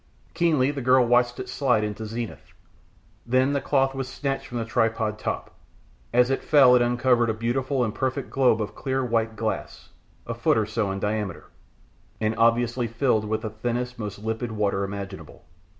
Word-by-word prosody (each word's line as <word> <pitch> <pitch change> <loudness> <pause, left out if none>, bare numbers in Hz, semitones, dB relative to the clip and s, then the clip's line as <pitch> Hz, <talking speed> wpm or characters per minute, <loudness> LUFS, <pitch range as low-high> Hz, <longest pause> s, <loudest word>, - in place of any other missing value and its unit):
Keenly 155 -6 +2
the 140 -2 -5
girl 130 0 +4
watched 120 0 +2
it - - -5
slide 125 -6 +1
into 105 +1 -4
zenith, 115 0 -6 0.7
then 130 +3 +2
the 140 - 0
cloth 135 -1 +1
was 135 -1 -4
snatched 135 +1 -3
from 120 - -5
the 115 - -2
tripod 110 -1 0
top. - - -4 0.6
As 125 +2 +3
it 135 - 0
fell 135 -5 +6
it 125 - +4
uncovered 120 0 +2
a 110 - 0
beautiful 125 +4 0
and 110 -3 -2
perfect 130 +2 -2
globe 125 -5 +3
of 105 - -7
clear 130 -1 -2
white 115 -2 0
glass, 110 0 -4 0.4
a - - -3
foot - - +2
or 110 - +2
so 105 -1 -1
in 95 0 -3
diameter, 105 -3 -3 0.7
and 110 0 0
obviously 120 +1 +2
filled 115 -1 +1
with 110 +1 -2
the 110 - -4
thinnest, 120 +2 -3
most 105 -2 -5
limpid 110 +3 -3
water 100 -2 0
imaginable. 100 -1 -7
120 Hz, 180 wpm, -25 LUFS, 110-130 Hz, 0.7 s, fell